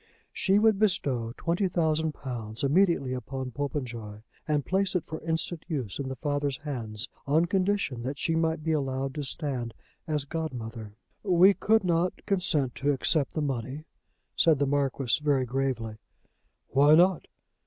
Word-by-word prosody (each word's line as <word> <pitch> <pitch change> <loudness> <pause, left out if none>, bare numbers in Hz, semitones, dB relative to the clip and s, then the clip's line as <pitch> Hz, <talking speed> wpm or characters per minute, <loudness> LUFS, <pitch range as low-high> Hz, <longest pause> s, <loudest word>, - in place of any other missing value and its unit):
She 195 +1 +3
would 215 -1 +4
bestow 135 - +1
twenty 175 +3 0
thousand 160 -3 +1
pounds 115 -5 -6
immediately 150 -3 +3
upon 130 +1 -5
Popenjoy, 120 -6 -5 0.2
and 150 -2 +1
place 190 0 0
it 180 - 0
for 160 - -6
instant 165 0 -2
use 135 - -3
in 135 -1 -3
the 130 - -4
father's 145 0 -1
hands, 120 -5 -5 0.2
on 155 +4 +4
condition 185 -8 0
that 135 +4 -4
she 165 - 0
might 160 -1 0
be 160 - 0
allowed 135 -2 -1
to 150 - -4
stand 130 -5 -3 0.3
as 150 -3 -1
godmother! 115 -9 -5 0.3
"We 185 0 +6
could 220 +2 +2
not 175 0 0
consent 165 - +1
to 145 +1 +1
accept 145 +2 0
the 155 - -1
money," 135 +2 -3 0.5
said 160 -3 +4
the 140 - +1
Marquis 135 -1 +1
very 140 -3 +2
gravely. 125 -4 -2 0.7
"Why 145 +3 +6
not? 180 +1 +4
145 Hz, 155 wpm, -28 LUFS, 130-165 Hz, 0.7 s, We